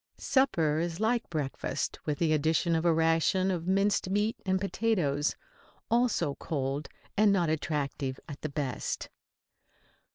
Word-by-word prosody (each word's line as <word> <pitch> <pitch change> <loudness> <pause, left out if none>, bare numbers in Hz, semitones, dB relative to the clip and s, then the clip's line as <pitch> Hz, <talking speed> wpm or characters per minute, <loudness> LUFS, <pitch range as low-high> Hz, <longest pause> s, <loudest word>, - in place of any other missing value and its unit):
Supper 165 - +2
is 170 +1 -2
like 225 +2 +1
breakfast 150 -5 -3
with 150 -1 -1
the 160 -1 +2
addition 160 +3 +2
of 165 +1 +1
a 170 - +5
ration 165 +4 +2
of 175 -2 -3
minced 195 0 +2
meat 205 +3 +1
and 190 0 +2
potatoes, 180 -8 0 0.6
also 235 - +2
cold 140 -1 -2 0.3
and 210 0 +5
not 175 -5 +2
attractive 140 -4 -2
at 145 - -8
the 155 - -3
best. 140 -3 -3
165 Hz, 135 wpm, -29 LUFS, 150-195 Hz, 0.6 s, a